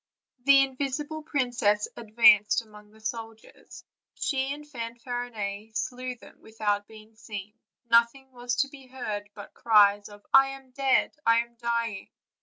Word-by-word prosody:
The 280 -1 +7
invisible 280 +3 -3
princess 245 -8 0
advanced 215 -1 +4
among 210 -1 -16
the 220 +1 -20
soldiers; 225 0 -8 0.3
she 270 0 -1
and 295 +1 -7
Fanfarinet 230 -4 -5
slew 255 0 -4
them - - -17
without 205 -2 -2
being 220 0 -15
seen; 210 -2 -8 0.3
noth 235 +1 +4
ing 265 -1 -17
was 245 -1 -3
to - - -8
be 275 -2 -14
heard 215 -6 -5
but 205 - -11
cries 205 -2 +4
of 205 0 -15
"I 270 0 +8
am 265 -1 -25
dead, 270 0 +2
I 230 -1 +4
am 235 0 -21
dying. 235 -3 -2
230 Hz, 145 wpm, -27 LUFS, 215-260 Hz, 0.3 s, I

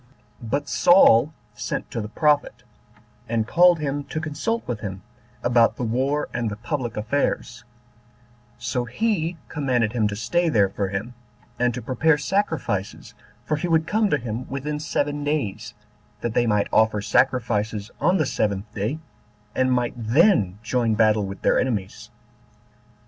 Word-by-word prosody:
2. 115 - -8
But 140 +5 -1
Saul 155 -7 +5 0.2
sent - - -4
to 115 - -3
the 105 - -5
prophet, 150 +5 +1 0.7
and 115 -1 0
called 175 +6 +5
him 145 -1 -2
to 155 - -4
consult 160 +9 -3
with 120 -4 -3
him 95 -3 -6 0.4
about 120 -1 +3
the - - -4
war 130 +6 0
and 115 -2 -1
the 105 - -5
public 120 0 -4
affairs; 125 +1 -2 0.9
so 120 +1 -2
he 175 - -1
commanded 125 -7 0
him 110 -4 +1
to 105 - -4
stay 170 +12 0
there 100 -9 +3
for 100 0 -2
him, 100 +6 -4 0.5
and 120 0 +2
to 125 - -6
prepare 145 +6 +2
sacrifices, 150 - -2 0.3
for 155 - 0
he 165 - -2
would 160 -1 +2
come 215 +2 +1
to 150 - +2
him 120 -1 -5
within 145 +2 -3
seven 145 -1 -2
days, 110 -9 -2 0.5
that 120 - -2
they 120 0 +2
might 105 -2 +2
offer 110 -1 +3
sacrifices 110 -2 0
on 180 +2 +3
the 155 - +1
seventh 105 -3 -2
day, 110 +9 -2 0.6
and 130 0 +1
might 125 -1 +1
then 115 - +3
join 115 -1 +1
battle 110 -2 +3
with 95 0 -9
their - - +3
enemies. 105 -7 -3
125 Hz, 155 wpm, -23 LUFS, 110-150 Hz, 0.9 s, Saul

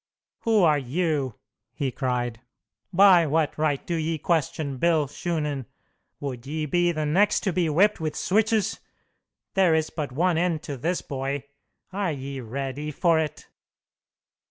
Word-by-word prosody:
"Who 220 -4 +3
are 155 -3 +4
you?" 140 -2 -1 0.4
he 135 -2 -1
cried. 120 -3 -2 0.5
"By 185 -3 +6
what 155 0 +1
right 150 -3 0
do 175 - -3
ye 160 0 -1
question 150 -3 -1
Bill 160 +1 +3
Shunan? 150 - -3 0.5
Would 130 -3 -6
ye 155 +1 -2
be 175 +4 +2
the 155 -2 -2
next 190 +8 +3
to 195 - -1
be 170 -2 +1
whipped 195 +7 +3
with 155 -1 -3
switches? 215 +1 +1 0.7
There 185 -4 +4
is 160 -1 0
but 150 -5 -4
one 165 +5 +1
end 170 -3 0
to 145 -5 -5
this, 170 +8 -2
boy! 135 0 -3 0.5
Are 195 -3 0
ye 135 0 -6
ready 135 +4 -4
for 165 +2 +2
it?" 155 -2 -4
155 Hz, 150 wpm, -25 LUFS, 140-175 Hz, 0.7 s, By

